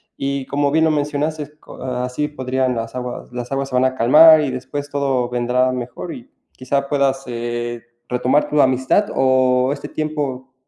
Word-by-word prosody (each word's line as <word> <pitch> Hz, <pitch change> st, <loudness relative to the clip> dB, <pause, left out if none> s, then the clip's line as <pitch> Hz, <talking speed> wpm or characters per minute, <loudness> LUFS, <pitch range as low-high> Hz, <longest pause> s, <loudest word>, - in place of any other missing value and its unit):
y 140 Hz, -1 st, -3 dB
como 145 Hz, 0 st, 0 dB
bien 160 Hz, +1 st, +3 dB
lo 160 Hz, -, +3 dB
mencionaste 150 Hz, 0 st, -2 dB
co -, -, -13 dB
así 125 Hz, +3 st, -2 dB
podrían 130 Hz, -3 st, -1 dB
las 115 Hz, 0 st, -4 dB
aguas 125 Hz, 0 st, -6 dB
las 125 Hz, +1 st, -6 dB
aguas 135 Hz, 0 st, -2 dB
se 130 Hz, -, -4 dB
van 125 Hz, +1 st, +3 dB
a 130 Hz, 0 st, 0 dB
calmar 155 Hz, +7 st, +7 dB
y 140 Hz, -3 st, -1 dB
después 130 Hz, +3 st, -5 dB
todo 135 Hz, -3 st, 0 dB
vendrá 125 Hz, +1 st, +1 dB
mejor 125 Hz, +7 st, -6 dB
y 255 Hz, +2 st, -11 dB, 0.2 s
quizá 140 Hz, +2 st, -2 dB
puedas, 135 Hz, -2 st, 0 dB
eh, 120 Hz, 0 st, -4 dB, 0.3 s
retomar 125 Hz, +4 st, +1 dB
tu 150 Hz, -1 st, +2 dB
amistad 130 Hz, +10 st, +2 dB
o 130 Hz, 0 st, +3 dB
este -, -, -8 dB
tiempo 140 Hz, -4 st, -4 dB
130 Hz, 175 wpm, -19 LUFS, 125-145 Hz, 0.3 s, calmar